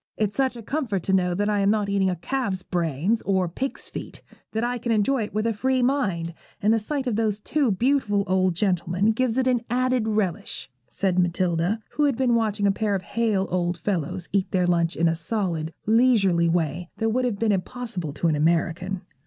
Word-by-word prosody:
'It's 210 -1 0
such 265 -2 +1
a 230 - -9
comfort 220 - -2
to 195 - 0
know 180 -2 +2
that 205 +2 0
I 210 -1 +1
am 200 0 +3
not 210 -1 +1
eating 200 -1 +2
a 180 - -1
calf's 195 0 -2
brains 175 - 0
or 190 -2 +1
a - - -4
pig's 265 +10 -4
feet, - - -8 0.3
that 220 +1 -1
I 245 0 -1
can 235 0 -2
enjoy 225 +4 +2
it - - -11
with 215 +1 0
a 230 - +1
free 255 +4 +1
mind, 195 -11 0 0.3
and 210 +2 +3
the 225 - +3
sight 270 +5 -3
of 235 -4 -1
those 215 -2 0
two 285 +3 0
beautiful 215 -1 +1
old 185 -2 +1
gentlemen 180 +2 +1
gives 245 +1 0
it 260 - +2
an 250 -2 +2
added 255 -1 +1
relish,' 205 -10 -2 0.2
said 185 -2 0
Matilda, 175 +3 +1
who 300 - +1
had 275 -5 +1
been 255 -2 +2
watching 215 -3 +1
a 200 - +5
pair 205 0 0
of 190 - -3
hale 210 -1 0
old 175 -1 0
fellows 175 -1 -2
eat 195 -1 +1
their 180 -2 +1
lunch 170 -1 +1
in 170 - +2
a 165 - +2
solid, 165 -2 -2
leisurely 210 -7 +4
way 165 0 -1
that 225 - 0
would 250 +3 +1
have 235 -5 -1
been 225 0 +1
impossible 200 - -3
to 170 - 0
an 155 - +2
American. 170 +4 0
200 Hz, 215 wpm, -24 LUFS, 180-230 Hz, 0.3 s, a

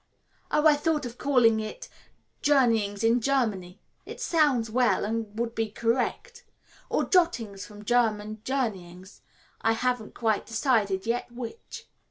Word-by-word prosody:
"Oh, 300 - +1
I 310 - +8
thought 300 -1 0
of 245 0 -8
calling 245 -6 +3
it 220 - -6 0.5
Journeyings 230 -8 +2
in 230 +2 +3
Germany. 215 -8 -1 0.2
It - - -10
sounds 280 -9 +2
well, 240 -5 +2
and 220 -1 -4
would 230 0 -2
be 225 -1 -2
correct. 250 - -2 0.5
Or - - +1
Jottings 240 - +1
from 210 0 -13
German 215 -2 0
Journeyings, 190 -8 -4 0.4
I 225 - +2
haven't 245 -1 -2
quite 220 -3 0
decided 225 -5 +1
yet 240 +1 -2
which." 240 - -9
230 Hz, 135 wpm, -27 LUFS, 215-255 Hz, 0.5 s, I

